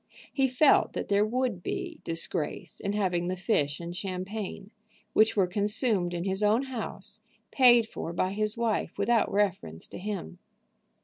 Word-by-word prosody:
He 270 -1 +3
felt 260 +3 +4
that - - -4
there 200 0 +4
would 235 -3 -1
be 360 - -4
disgrace 165 -1 -3
in 200 - -2
having 180 -4 0
the 185 - -1
fish 150 -7 0
and 170 0 -6
champagne, 195 +2 -5 0.4
which 220 0 +4
were 195 - +5
consumed 205 -1 +1
in 170 - -2
his 190 +1 -2
own 215 +5 +3
house, 260 -4 -6 0.3
paid 240 -4 +6
for 165 - -5
by 185 +2 0
his 215 +2 -1
wife 230 -2 -1
without 235 -2 +2
reference 170 - -1
to - - -8
him. 185 - -5
205 Hz, 160 wpm, -28 LUFS, 180-230 Hz, 0.4 s, paid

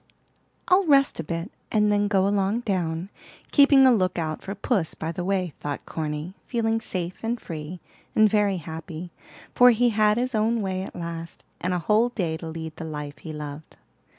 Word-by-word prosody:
"I'll 370 0 +4
rest 275 - +4
a - - -1
bit, 165 +5 -4 0.2
and 210 -1 +3
then 205 0 +2
go 195 -2 +2
along 200 +3 +1
down, 180 -3 -2 0.4
keeping 280 -2 +7
a 260 - +7
look 185 -5 +1
out 155 -2 -2
for 195 - -6
puss 200 -4 -1
by 160 +1 -3
the 175 +1 -4
way," 185 -3 -1
thought 145 -1 -5
Corny, 155 +2 -4
feeling 225 -2 0
safe 180 -4 -4
and 230 +1 -2
free, 165 0 -7 0.4
and 215 0 +6
very 205 -2 +2
happy, 165 +1 -7 0.4
for 250 0 +7
he 240 +1 +4
had 215 -1 +3
his 250 +1 -1
own 220 +1 +1
way, 185 -1 -2
at 190 - -7
last, 170 -1 -6 0.2
and 180 - -1
a 180 - +1
whole 210 +7 +3
day 175 -9 -2
to 165 - -8
lead 160 0 -6
the - - -6
life 150 -2 -6
he 160 - -7
loved. 150 0 -8
185 Hz, 190 wpm, -25 LUFS, 165-220 Hz, 0.4 s, keeping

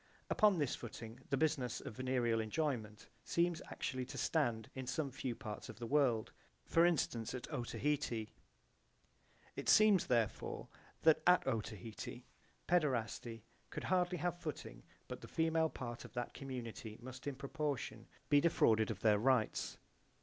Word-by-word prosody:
Upon 210 -3 +5
this 145 -5 +1
footing 115 0 -8
the 140 - +2
business 140 -5 +1
of - - -7
venereal 125 -3 +1
enjoyment 110 -3 -2 0.2
seems 170 -1 +1
actually 130 -1 -3
to - - -8
stand 120 -9 +1
in 130 -1 -5
some 140 +1 -1
few 130 -2 -3
parts 110 -5 -7
of - - -8
the 120 - -5
world, 125 -4 +2 0.3
for 165 +1 +5
instance 125 -8 0
at 125 - -5
Otaheite. 125 -3 -1 1.3
It - - -2
seems 215 -4 +6
therefore 115 -4 0 0.3
that 160 -1 +6
at 180 0 +6
Otaheite 115 0 -4 0.4
paederasty 120 - 0 0.3
could - - -5
hardly 180 -1 +2
have 175 +2 -1
footing, 155 - -6 0.3
but - - -6
the - - -9
female 160 0 +2
part 120 -4 -6
of - - -11
that 120 -1 -3
community 115 -5 -6
must 130 +3 -9
in 140 - -2
proportion 140 0 -3 0.2
be 145 0 +5
defrauded 110 -9 +4
of 105 -2 -4
their 105 -2 +5
rights. 125 -2 +2
130 Hz, 145 wpm, -37 LUFS, 115-155 Hz, 1.3 s, seems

